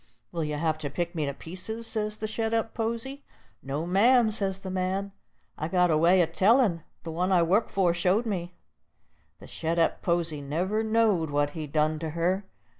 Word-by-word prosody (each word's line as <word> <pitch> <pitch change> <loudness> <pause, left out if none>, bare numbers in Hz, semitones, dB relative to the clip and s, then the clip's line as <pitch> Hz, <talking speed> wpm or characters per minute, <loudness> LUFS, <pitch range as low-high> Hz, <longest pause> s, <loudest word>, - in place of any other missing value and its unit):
"Will 165 -2 -2
you 150 -1 -2
have 155 +1 -1
to 150 -2 -4
pick 170 +4 -3
me 155 -4 -2
to 140 - -2
pieces?" 220 +9 -5
says 215 -1 -1
the 215 - -3
shet 225 +1 -1
up 225 0 -1
posy. 235 +5 -3 0.4
"No, 140 +4 -3
ma'am," 220 +5 +4
says 195 -3 -1
the 190 - -6
man; 190 +2 -2 0.5
"I've 155 +3 -4
got 180 -2 +4
a 155 - +3
way 175 +2 +5
o' - - +2
tellin', 190 +2 +3 0.2
the 165 - -5
one 180 +4 -1
I 175 -2 +5
work 195 +7 +2
for 185 -3 +2
showed 185 +6 +1
me." 180 -5 -3 0.8
The - - -13
shet 165 +1 -3
up 165 - +1
posy 170 -4 0
never 180 +10 -1
knowed 215 -7 +2
what 145 0 +1
he 155 0 -5
done 155 +1 +1
to 160 0 -3
her. 185 +4 0
180 Hz, 195 wpm, -27 LUFS, 160-215 Hz, 0.8 s, way